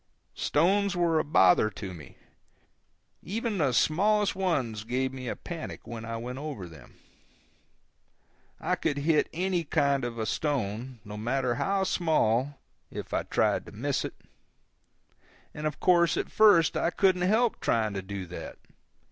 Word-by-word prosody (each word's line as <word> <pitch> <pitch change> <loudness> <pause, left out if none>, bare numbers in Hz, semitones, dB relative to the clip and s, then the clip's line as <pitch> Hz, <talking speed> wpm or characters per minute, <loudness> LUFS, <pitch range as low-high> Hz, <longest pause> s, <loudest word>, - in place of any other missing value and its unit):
Stones 195 +5 +2
were 170 -2 +2
a - - +1
bother 100 -7 +4
to 100 -2 -7
me. 75 -6 -12 1.0
Even 215 +1 -3
the 145 -4 +2
smallest 200 - +2
ones 130 - -1
gave 130 +3 -1
me 130 -1 -7
a - - -2
panic 165 -2 -7
when 115 -1 -7
I 115 0 -4
went 125 +3 -6
over 140 -12 -6
them. 80 -3 -15 1.6
I - - -1
could 150 -3 -1
hit 150 +2 +2
any 180 0 -1
kind 140 -3 +1
of 120 -1 -4
a 110 - -2
stone, 125 -2 -2
no 105 0 -7
matter 125 +3 0
how 195 +10 0
small, 145 - +1 0.3
if - - -7
I - - +1
tried - - 0
to - - -10
miss - - -1
it; - - -6 1.4
and 150 0 -3
of 150 - -5
course 170 -3 +4
at - - -3
first 205 -7 +5
I - - +1
couldn't 185 0 +2
help 220 +6 +2
trying 110 -2 +1
to 95 - -3
do 95 0 -6
that. 90 0 -8
145 Hz, 155 wpm, -28 LUFS, 115-175 Hz, 1.6 s, first